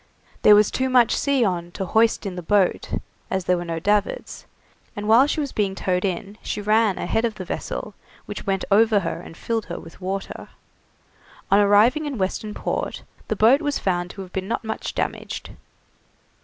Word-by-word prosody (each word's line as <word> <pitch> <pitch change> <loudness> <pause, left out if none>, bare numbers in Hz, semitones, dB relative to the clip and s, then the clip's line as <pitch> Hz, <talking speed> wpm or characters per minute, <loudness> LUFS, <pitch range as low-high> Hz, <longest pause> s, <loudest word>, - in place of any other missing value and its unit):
There 210 - +8
was 210 0 +4
too 260 0 0
much 245 -3 +4
sea 275 -4 +2
on 175 -3 -2
to 190 - -3
hoist 220 +4 +2
in 190 -2 -4
the 180 - -5
boat, 195 +2 +1 0.4
as 190 -1 -2
there 180 - +3
were 175 - -3
no 165 -1 -4
davits, 205 +4 -1 0.5
and 205 0 -4
while 235 +6 +6
she 310 - -1
was 285 -2 -2
being 200 -2 -1
towed 180 -1 -1
in 195 +2 -3
she - - -4
ran 215 -1 +2
ahead 225 - -1
of 230 -2 -1
the 185 - -7
vessel, - - -5 0.3
which 205 - -6
went 195 -1 0
over 215 0 +5
her - - -4
and 165 - -12
filled 225 -2 -2
her 175 - -5
with 165 +3 -14
water. 195 +1 -4 1.0
On 200 - +6
arriving 215 +9 +4
in 280 -4 -4
Western 210 +2 -2
Port - - -3 0.2
the 215 - -1
boat 235 - +5
was 290 -2 -1
found 175 -2 -1
to 195 - -7
have 185 - -14
been 190 0 -3
not 230 - -2
much 220 - -4
damaged. - - -4
205 Hz, 195 wpm, -23 LUFS, 190-225 Hz, 1.0 s, There